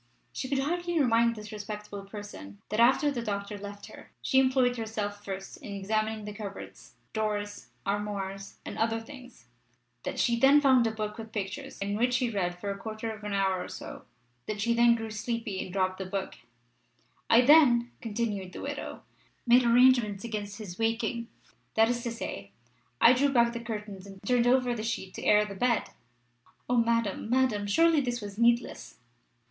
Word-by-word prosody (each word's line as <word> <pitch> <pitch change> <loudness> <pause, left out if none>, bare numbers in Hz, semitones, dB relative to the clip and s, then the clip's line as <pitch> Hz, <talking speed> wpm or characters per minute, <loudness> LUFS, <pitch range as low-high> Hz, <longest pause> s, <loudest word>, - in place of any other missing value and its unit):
She 260 - -4
could 275 - +1
hardly 345 +4 0
remind 235 -3 +3
this 210 -1 -9
respectable 210 -1 -7
person 195 - -9
that 215 - -1
after 265 +5 +5
the 245 -4 -3
doctor 200 -2 -3
left 205 0 -8
her - - -13
she 265 - +3
employed 260 -2 +3
herself 210 -2 -4
first 195 -1 -6
in 200 - -8
examining 215 +2 -1
the 210 - -6
cupboards, 205 -2 -9 0.2
drawers, 205 -1 -2 0.2
armoire, 200 -1 -2 0.3
and - - -6
other 225 0 +1
things; 245 - -13 0.6
that - - -4
she 235 -1 +2
then 275 +4 +7
found 260 -5 +5
a - - 0
book 215 0 -5
with 225 0 -8
pictures, 220 +7 -5
in 200 +1 -2
which 245 +3 +2
she 250 -2 +1
read 180 -4 -1
for 200 +2 -4
a 200 - -5
quarter 220 +2 -5
of 215 -1 -10
an 210 -1 -3
hour 190 -2 +1
or - - -8
so; - - -9 0.4
that 215 -1 -3
she 235 +3 +2
then 235 0 +5
grew 225 -1 -5
sleepy 215 -2 -3
and 185 - -9
dropped 185 0 0
the 190 - -3
book 195 0 -3 1.0
"I 230 - +7
then," 250 -4 +6
continued 210 -5 -3
the - - -7
widow, 285 +1 -6 0.4
"made 245 +1 +6
arrangements 235 -4 +4
against 205 -3 -5
his 200 -4 -8
waking 230 +1 -1 0.5
that 225 +1 +5
is 240 0 -1
to 235 -1 -3
say, 100 - -6 0.5
I 235 - +8
drew 280 +3 +3
back 235 -3 +3
the 235 - -4
curtains 210 -4 -6
and 195 -1 -11
turned 245 +1 +3
over 250 -1 +3
the 225 - -4
sheet 215 -4 -3
to - - -7
air 210 0 +5
the 205 - -7
bed" 235 +3 0 0.8
O 245 - +1
Madame! 230 -3 +1
Madame! 245 -5 +2
Surely 325 +7 +4
this 245 -2 -2
was 205 -1 -8
needless! 235 +1 +1
220 Hz, 185 wpm, -29 LUFS, 205-245 Hz, 1.0 s, I